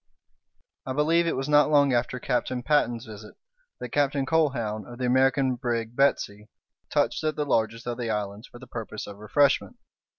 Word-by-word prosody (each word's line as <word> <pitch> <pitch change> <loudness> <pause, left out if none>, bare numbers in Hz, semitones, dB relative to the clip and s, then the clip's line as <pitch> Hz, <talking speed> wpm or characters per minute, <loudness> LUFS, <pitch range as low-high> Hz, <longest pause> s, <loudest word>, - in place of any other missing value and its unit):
I 130 - -4
believe 165 +4 +2
it - - 0
was 135 +1 -3
not 150 -1 +5
long 145 -3 +4
after 120 +1 0
Captain 125 0 -1
Patten's 120 -5 +1
visit 105 -1 -11 0.4
that - - -6
Captain 140 -1 +1
Colquhoun, 130 -9 0
of 120 - -9
the 125 - -2
American 130 +1 +3
brig 120 -2 -3
Betsey, 105 -6 0 0.4
touched - - 0
at 155 -1 0
the 150 - -1
largest 115 -3 0
of 120 0 -4
the 120 -2 -2
islands 105 0 -3
for - - -14
the 130 - -12
purpose 115 -3 -6
of 100 - -10
refreshment. 140 +7 +2
125 Hz, 175 wpm, -26 LUFS, 115-140 Hz, 0.4 s, not